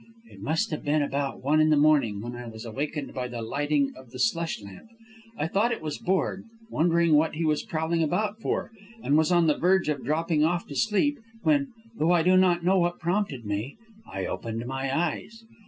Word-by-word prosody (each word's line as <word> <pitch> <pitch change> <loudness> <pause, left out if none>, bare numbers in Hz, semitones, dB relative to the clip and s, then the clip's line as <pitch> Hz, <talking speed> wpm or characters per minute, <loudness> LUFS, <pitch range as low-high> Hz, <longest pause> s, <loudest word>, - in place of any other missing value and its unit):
"It - - -14
must 160 +8 0
have 155 - -4
been 145 0 +2
about 140 -1 -3
one 150 +3 +3
in 155 - +4
the 155 - +4
morning 145 -9 +3
when 120 +1 -6
I 120 0 -7
was 110 0 -9
awakened 140 +5 -4
by 125 -1 -3
the 120 -2 -6
lighting 145 +3 0
of 130 -2 -14
the - - -10
slush 170 -7 0
lamp. 100 - -12 0.5
I - - -1
thought 205 +8 +1
it 235 - -2
was 155 -2 -4
Borg; 190 +1 -1 0.3
wondered 170 +1 +2
what 155 +1 +3
he 165 +1 -1
was 150 -1 +1
prowling 165 +1 -1
about 205 +7 0
for, - - -2 0.3
and 145 - +2
was 160 +3 +3
on 175 -1 +4
the 150 -2 +2
verge 185 -2 +3
of 145 -3 -2
dropping 155 0 +1
off 170 +2 +1
to 140 - -7
sleep, 230 - +1 0.2
when, 285 -2 +3 0.3
though 165 +3 +3
I 170 -2 +3
do 185 +2 +4
not 180 -2 +3
know 190 +1 +4
what 175 0 0
prompted 170 - -1
me, 105 - -3 0.3
I 95 -1 -3
opened 115 +1 -4
my 135 +1 -3
eyes. 175 +9 -2
155 Hz, 210 wpm, -26 LUFS, 135-175 Hz, 0.5 s, in